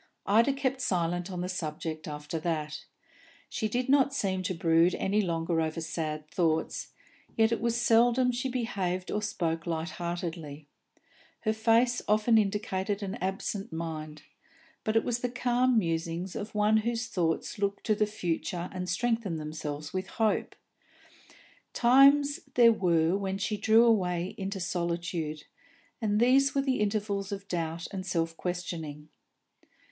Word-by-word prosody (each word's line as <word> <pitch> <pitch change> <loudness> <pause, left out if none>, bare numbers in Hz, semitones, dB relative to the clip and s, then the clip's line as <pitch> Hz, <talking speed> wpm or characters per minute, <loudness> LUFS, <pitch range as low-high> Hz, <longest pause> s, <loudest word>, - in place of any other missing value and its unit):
Ida 230 +7 +4
kept 270 -1 -1
silence 175 -2 0
on 180 -2 -4
the 180 - -2
subject 155 -3 -4
after 150 +2 -5
that. 155 -2 -3 0.6
She 220 - -1
did 245 +3 -1
not 275 0 +4
seem 190 -6 0
to 185 0 -2
brood 165 +1 +3
any 205 +2 +1
longer 165 -2 0
over 160 +1 -2
sad 155 -2 -4
thoughts, 160 -1 0 0.5
yet 225 0 +4
it 230 - 0
was 235 0 +1
seldom 240 +2 +4
she 245 +2 -2
behaved 195 -7 -2
or 210 - -1
spoke 165 -5 -2
light 160 -1 -2
heartedly; 165 -4 -4 0.8
her 220 -1 +1
face 230 +2 +3
often 215 +2 +4
indicated 205 0 -1
an 195 -1 -3
absent 195 +1 -3
mind, 155 -2 -5 0.6
but 220 - -1
it 225 - +4
was 240 -1 -1
the 245 - -1
calm 250 0 +2
musing 165 -1 -1
of 210 +1 -6
one 210 +1 +4
whose 230 +2 -1
thoughts 180 -2 -1
look 200 0 -1
to 215 - +2
the 210 0 +1
future 175 -3 -3
and 180 -1 -4
strengthen 225 -1 0
themselves 150 -1 -5
with 185 0 -2
hope. 220 +1 0 1.2
Times 280 +4 +5 0.2
there 235 -2 +7
were 170 -4 +2
when 195 -1 -2
she 215 +2 -1
drew 220 +3 +5
away 180 -5 +1
into 195 0 -4
solitude, 170 -3 -2 0.6
and 210 -1 +1
these 270 +4 +4
were 275 - +3
the 265 -2 0
intervals 205 -1 -1
of 200 0 -5
doubt 165 -2 -3
and 190 -2 -4
self 165 -3 -1
questioning. 165 -4 -5
190 Hz, 150 wpm, -29 LUFS, 165-225 Hz, 1.2 s, there